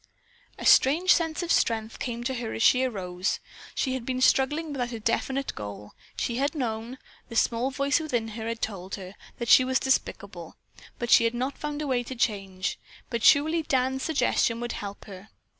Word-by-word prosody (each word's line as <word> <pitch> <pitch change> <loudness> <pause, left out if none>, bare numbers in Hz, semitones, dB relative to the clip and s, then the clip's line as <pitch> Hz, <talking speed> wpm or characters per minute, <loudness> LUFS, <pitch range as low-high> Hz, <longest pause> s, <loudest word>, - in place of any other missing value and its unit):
A - - -7
strange 325 +8 +6
sense 325 0 -1
of 340 - -2
strength 220 -1 +1
came 240 -1 -4
to 265 +2 -1
her 235 -3 -4
as 225 - -1
she 255 0 +5
arose. 185 -6 -2 0.4
She 260 - 0
had 260 -2 -3
been 255 +1 -2
struggling 295 +5 +2
without 250 -3 -3
a 230 - -5
definite 265 +5 -1
goal. 105 0 -8 0.3
She 235 - -2
had 280 +3 0
known, 235 -2 -3 0.3
the 230 - -8
small 235 +3 +2
voice 280 +3 +1
within 240 -8 -2
had 220 +1 -6
often 230 0 -2
told 195 -4 -4
her, 185 -1 -9 0.2
that 235 - -4
she 255 - +7
was 260 0 +1
despicable, 265 -1 -2 0.4
but 240 -1 -3
she 230 - +7
had 230 +1 0
not 260 +3 -2
found 295 0 -4
a - - -3
way 255 -2 +1
to 250 +2 -7
change, 195 -5 -2 0.3
but 235 -2 -2
surely 315 +3 +5
Dan's 265 -2 0
suggestion 250 -6 +1
would 240 0 -3
help 200 0 -7
her. 195 0 -11
245 Hz, 190 wpm, -27 LUFS, 220-270 Hz, 0.4 s, she